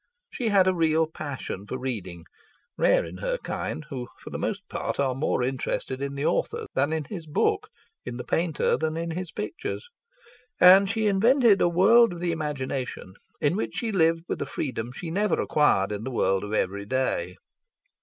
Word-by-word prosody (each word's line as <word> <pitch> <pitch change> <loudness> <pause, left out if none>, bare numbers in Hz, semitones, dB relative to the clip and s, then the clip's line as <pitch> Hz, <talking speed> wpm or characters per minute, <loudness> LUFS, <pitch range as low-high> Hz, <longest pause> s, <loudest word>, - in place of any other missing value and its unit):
She 235 -3 -1
had 195 -3 +5
a 185 - +4
real 160 -2 +2
passion 140 -10 -6
for 130 - -4
reading 95 -10 -5 0.5
(rare - - +3
in - - -8
her - - -2
kind, 155 - -4
who 125 -3 -4
for - - -11
the - - -4
most - - -3
part - - -4
are 135 -2 +2
more 130 -1 0
interested 130 0 -2
in 140 0 -3
the 140 +2 -2
author - - 0
than 140 +3 +1
in 160 -1 -1
his 170 0 -8
book, 150 - 0 0.3
in 120 -1 -6
the 125 - -5
painter 165 -2 +1
than 160 0 -1
in 165 0 -3
his 180 +1 -5
pictures), 330 - -5 0.7
and 190 +2 +8
she 220 +1 0
invented 220 +1 +4
a 175 - +4
world 200 +5 +5
of 175 - -8
the 175 0 0
imagination 135 - -4 0.3
in 150 +4 +2
which 215 - -3
she 230 -2 -2
lived 165 -3 +2
with - - -3
a - - -2
freedom 125 -4 -3
she 160 +6 -6
never 205 +4 +1
acquired 105 -10 +2
in 105 +1 -4
the 130 - -3
world 95 -6 +1
of 105 - -6
every 100 -1 -1
day. 105 -8 -1
155 Hz, 190 wpm, -26 LUFS, 130-185 Hz, 0.7 s, and